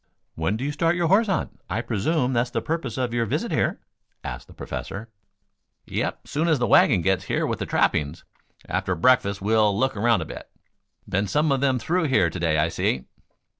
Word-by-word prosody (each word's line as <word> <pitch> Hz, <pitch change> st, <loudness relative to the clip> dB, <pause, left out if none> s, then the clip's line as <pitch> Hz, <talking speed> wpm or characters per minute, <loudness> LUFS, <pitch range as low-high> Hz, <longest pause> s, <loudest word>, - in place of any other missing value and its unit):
"When 80 Hz, +7 st, -1 dB
do 125 Hz, -, -5 dB
you 145 Hz, -, -1 dB
start 165 Hz, +3 st, +1 dB
your 170 Hz, -2 st, 0 dB
horse 215 Hz, +5 st, +4 dB
hunt? 190 Hz, -, -2 dB
I 115 Hz, -, -1 dB
presume 125 Hz, +5 st, 0 dB
that's 120 Hz, 0 st, +1 dB
the -, -, -1 dB
purpose 155 Hz, -8 st, -3 dB
of 125 Hz, -2 st, -1 dB
your 120 Hz, -1 st, 0 dB
visit -, -, -2 dB
here?" -, -, 0 dB, 0.4 s
asked -, -, -6 dB
the -, -, -15 dB
Professor. 110 Hz, +4 st, -6 dB, 0.8 s
"Yep. -, -, -3 dB
Soon 155 Hz, +3 st, -1 dB
as 160 Hz, -3 st, +3 dB
the 120 Hz, -, 0 dB
wagon 90 Hz, -6 st, +5 dB
gets 95 Hz, -1 st, +1 dB
here -, -, 0 dB
with -, -, -2 dB
the -, -, -3 dB
trappings. 75 Hz, +1 st, 0 dB, 0.4 s
After 95 Hz, -, -1 dB
breakfast 100 Hz, 0 st, +2 dB
we'll 105 Hz, -1 st, +3 dB
look 130 Hz, +2 st, +1 dB
around 110 Hz, -2 st, +2 dB
a -, -, -4 dB
bit. -, -, -9 dB, 0.6 s
Been 100 Hz, +2 st, 0 dB
some 150 Hz, +7 st, +1 dB
of 135 Hz, -1 st, +1 dB
them 135 Hz, -2 st, +2 dB
through 170 Hz, +7 st, 0 dB
here 95 Hz, -, +3 dB
to 90 Hz, -, -6 dB
day, 80 Hz, -2 st, +1 dB
I 80 Hz, +1 st, +2 dB
see." 65 Hz, -5 st, -1 dB
120 Hz, 205 wpm, -24 LUFS, 95-145 Hz, 0.8 s, wagon